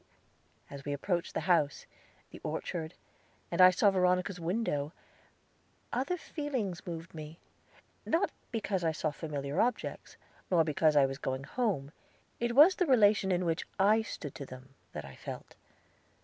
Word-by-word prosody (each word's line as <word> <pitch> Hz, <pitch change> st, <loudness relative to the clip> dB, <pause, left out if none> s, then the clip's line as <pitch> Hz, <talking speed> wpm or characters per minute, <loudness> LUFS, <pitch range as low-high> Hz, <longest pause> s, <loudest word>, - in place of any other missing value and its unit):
As 140 Hz, -1 st, -8 dB
we 145 Hz, -, -2 dB
approached 170 Hz, +4 st, -2 dB
the -, -, 0 dB
house, 160 Hz, -4 st, +2 dB, 0.5 s
the -, -, -10 dB
orchard, 160 Hz, -1 st, -4 dB, 0.6 s
and 170 Hz, -, +2 dB
I 185 Hz, -, +11 dB
saw 195 Hz, +3 st, +4 dB
Veronica's 180 Hz, 0 st, +1 dB
window, 165 Hz, -5 st, -1 dB, 1.0 s
other 270 Hz, +9 st, 0 dB
feelings 250 Hz, -, -4 dB
moved 165 Hz, -1 st, -6 dB
me. 155 Hz, 0 st, -8 dB, 0.7 s
Not 330 Hz, -, +1 dB, 0.2 s
because 205 Hz, -5 st, -1 dB
I 160 Hz, -1 st, +1 dB
saw 155 Hz, 0 st, -1 dB
familiar 145 Hz, -2 st, -2 dB
objects, 245 Hz, -1 st, -2 dB, 0.3 s
nor 170 Hz, -3 st, +4 dB
because 155 Hz, 0 st, +2 dB
I 140 Hz, -2 st, +6 dB
was 135 Hz, +1 st, -4 dB
going 130 Hz, 0 st, -3 dB
home 185 Hz, -, -1 dB, 0.5 s
it 235 Hz, 0 st, -1 dB
was 310 Hz, +7 st, +9 dB
the 360 Hz, -, +2 dB
relation 205 Hz, -6 st, +5 dB
in 180 Hz, 0 st, +1 dB
which 165 Hz, +1 st, 0 dB
I 210 Hz, +3 st, +5 dB
stood 150 Hz, -9 st, -6 dB
to 140 Hz, -, -7 dB
them, 130 Hz, +1 st, -11 dB, 0.2 s
that -, -, -5 dB
I 70 Hz, -1 st, -11 dB
felt. -, -, -8 dB
175 Hz, 150 wpm, -31 LUFS, 150-210 Hz, 1.0 s, I